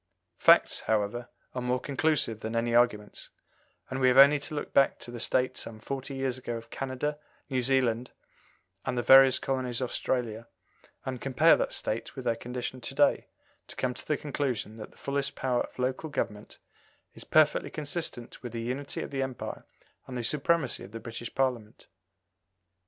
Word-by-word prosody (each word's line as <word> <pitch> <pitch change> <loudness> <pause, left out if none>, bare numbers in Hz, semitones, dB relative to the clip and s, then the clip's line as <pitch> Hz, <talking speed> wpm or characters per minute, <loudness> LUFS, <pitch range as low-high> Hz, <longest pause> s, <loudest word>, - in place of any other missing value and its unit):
Facts, - - +6
however, 110 +3 0 0.2
are 125 - -3
more 125 +1 0
conclusive 140 -5 0
than 110 +1 -4
any 115 0 0
arguments; 120 -4 +1 0.6
and 130 - -4
we 130 - +4
have 125 +1 +4
only 140 +2 +8
to 150 +2 -6
look 145 - -5
back 135 - +4
to 120 - -9
the 120 - -7
state 130 +2 +1
some 115 - -6
forty 135 +4 -5
years 135 -1 -1
ago 120 -2 -4
of 115 0 -12
Canada, 135 +3 -3 0.3
New 130 -1 +1
Zealand, 125 -2 +1 0.7
and 130 -1 -2
the 120 - 0
various 135 -1 +8
colonies 130 -3 -2
of 125 -2 -2
Australia, 115 -3 -2 0.6
and 130 -2 -4
compare 135 +5 +5
that - - -1
state 110 +2 -2
with 130 - -7
their 115 -1 +2
condition 125 +2 -5
to - - -5
day, - - +3 0.4
to - - -6
come 125 -1 -1
to - - -8
the 150 - +1
conclusion 130 -7 -3
that 110 - -8
the - - -23
fullest 140 0 -2
power 125 -2 0
of - - -7
local 130 +5 -2
government 105 -7 -4 0.6
is - - -10
perfectly 155 -1 +3
consistent 150 -5 -5
with 120 -2 -7
the 115 - -3
unity 130 +4 -3
of - - -8
the 135 -1 -2
Empire 130 -2 -5 0.4
and 125 - -5
the 120 - -3
supremacy 150 +2 +1
of 100 - -12
the 115 - -5
British 115 +1 -7
Parliament. 125 -5 -1
125 Hz, 180 wpm, -29 LUFS, 115-135 Hz, 0.7 s, only